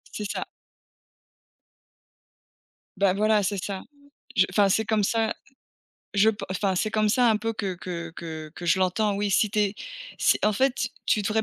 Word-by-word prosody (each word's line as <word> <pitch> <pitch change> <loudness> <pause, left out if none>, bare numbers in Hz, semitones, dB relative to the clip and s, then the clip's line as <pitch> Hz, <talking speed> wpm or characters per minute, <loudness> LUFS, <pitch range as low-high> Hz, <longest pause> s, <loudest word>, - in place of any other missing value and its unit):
C'est 210 -1 -4
ça. - - -3 2.5
Bah 195 -1 +3
voilà, 215 +1 +3
c'est 195 -1 -1
ça, 195 -2 -4 0.5
je 190 -4 +5
enfin, 200 +1 +4
c'est 220 +3 +2
comme 215 -1 +1
ça 225 +2 +1 0.8
je 205 +2 +5
pen 215 - -7
enfin 190 0 0
c'est 215 +3 0
comme 215 -1 +2
ça 245 +3 +4
un 220 - +4
peu, 225 +1 -2
que 200 -4 -3
que 170 -2 -6
que 160 -2 -7
que 175 - -8
je 185 +3 +3
l'entends, 200 +3 +1
oui. 205 0 0
Si 210 +2 +3
tu 215 - -2
es 205 -1 +2 0.4
si - - +3
en 210 - +4
fait, 255 +2 +1 0.2
tu 210 - +2
devrais 215 +2 +1
205 Hz, 180 wpm, -26 LUFS, 190-220 Hz, 2.5 s, je